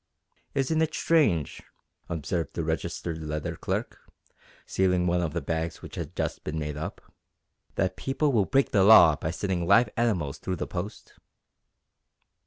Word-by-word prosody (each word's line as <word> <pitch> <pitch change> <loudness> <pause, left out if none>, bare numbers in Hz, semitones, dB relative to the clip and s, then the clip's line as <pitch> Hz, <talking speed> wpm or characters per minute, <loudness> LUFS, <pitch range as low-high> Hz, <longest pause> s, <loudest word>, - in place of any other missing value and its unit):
"Isn't 150 +4 +1
it 160 0 0
strange," 105 - +2 0.5
observed 85 -1 -3
the 85 - -1
registered 80 +1 -3
letter 75 0 -4
clerk, - - -3 0.7
sealing 90 -1 +1
one 90 0 +1
of 80 -3 -2
the - - -3
bags 80 0 -3
which - - -10
had - - -6
just - - -3
been 75 +1 -4
made 75 -1 -3
up, 75 +2 -6 0.7
"that 95 - 0
people 140 +2 0
will 110 -6 +3
break 135 +5 +2
the 100 - +4
law 95 -7 +8
by 80 - -4
sending 90 0 -2
live 120 +6 +5
animals 90 - 0
through 95 - -3
the - - -3
post?" 95 +4 -7
90 Hz, 155 wpm, -27 LUFS, 80-110 Hz, 0.7 s, law